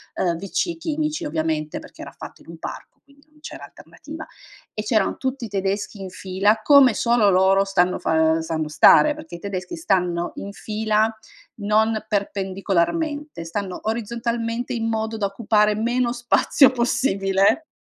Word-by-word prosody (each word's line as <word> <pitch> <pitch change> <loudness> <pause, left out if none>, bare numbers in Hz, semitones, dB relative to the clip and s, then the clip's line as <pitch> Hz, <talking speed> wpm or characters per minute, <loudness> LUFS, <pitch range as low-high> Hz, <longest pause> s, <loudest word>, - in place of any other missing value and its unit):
ehm, 170 -2 0
WC 200 - -2
chimici, 310 -1 -2
ovviamente, 155 -1 -2
perché - - -13
era - - -8
fatto - - -11
in - - -18
un 165 - -10
parco, - - -9
quindi, 280 +1 -25
non 305 0 -25
c'era 305 - -9
alternativa, - - -11 0.5
e 215 - -3
c'erano 215 0 +1
tutti 260 -2 -3
i - - -6
tedeschi 200 +1 -3
in 190 - -6
fila, 195 +3 0
come 275 -4 +6
solo 235 -3 +3
loro 190 +1 +4
stanno 185 -2 +1
fa 160 - 0 0.2
ehm, 165 - 0
sanno 160 -1 -3
stare, 165 - +6
perché, 305 - -10
i - - -9
tedeschi 200 - -5
stanno 180 - 0
in 200 - -7
fila, 215 +1 0 0.5
non 215 +1 +1
perpendicolarmente, 200 - -2
stanno 185 +2 -4
orizzontalmente, 235 +2 -3
in 225 -1 -2
modo 220 0 -2
da 205 -2 0
occupare 210 +1 +1
meno 240 +2 0
spazio 245 +3 +3
possibile 200 0 +1
215 Hz, 155 wpm, -22 LUFS, 190-240 Hz, 0.5 s, come